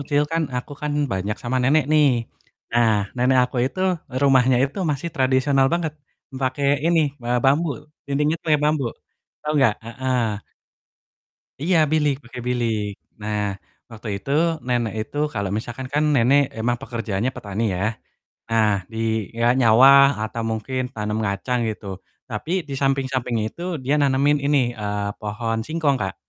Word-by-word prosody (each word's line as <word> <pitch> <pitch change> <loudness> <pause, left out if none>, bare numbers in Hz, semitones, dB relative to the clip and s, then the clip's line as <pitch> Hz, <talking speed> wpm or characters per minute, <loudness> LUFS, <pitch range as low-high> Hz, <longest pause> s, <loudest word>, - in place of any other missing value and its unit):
kecil 145 +1 +1
kan 165 0 +1
aku 125 +4 -5
kan 150 0 -1 0.2
banyak 100 +2 -2
sama 125 +2 -1
nenek 145 +3 +3
nih. 150 -1 +5 0.6
Nah 115 -1 +3 0.3
nenek 130 +1 +3
aku 125 0 -7
itu, 165 +8 -5 0.4
rumahnya 130 -2 +4
itu 140 +8 -5
masih 145 +4 -2
tradisional 135 +1 +3
banget, 170 -3 0 0.5
pake 130 +2 -1 0.2
ini, 170 -1 +4 0.2
be 120 - -5 0.2
bambu, 145 +5 +3 0.4
dindingnya 150 +3 +1
pake 155 -2 +4
bambu, 150 -3 +1 0.6
tau 150 0 -2
gak? 110 -4 +4
Heeh. 120 -3 -1 1.2
Iya 175 +1 +2 0.2
bilik, 150 -2 +3
pake 120 +1 -10
bilik. 115 -4 0 0.3
Nah, 105 0 -2 0.5
waktu 115 0 -9
itu 100 +7 -8 0.4
nenek 120 -3 0
itu 110 +6 -7 0.2
kalau 100 -2 -2
misalkan 120 +4 -5
kan 150 +1 +2
nenek 135 +3 +5 0.2
emang 120 +2 0
pekerjaannya 115 -3 -2
petani 100 +2 -4
ya. 90 - -3 0.7
Nah, 110 -1 +3 0.2
dia 110 0 -1
nyawah 135 +4 +7 0.2
atau 115 +1 -5
mungkin 110 +4 -3
tanam 105 0 -2
kacang 100 +6 -1
gitu, 105 -1 -6 0.4
tapi 115 +7 -5 0.2
di 140 - -4
samping-samping 130 -3 0
itu 140 - -9 0.2
dia 140 - +2
nanemin 140 +1 +3
ini, 145 0 +3 0.2
eee, 105 -1 -2
pohon 115 +2 -2
singkong 155 -4 +1
Kak. 95 - -3
125 Hz, 145 wpm, -22 LUFS, 110-140 Hz, 1.2 s, nyawah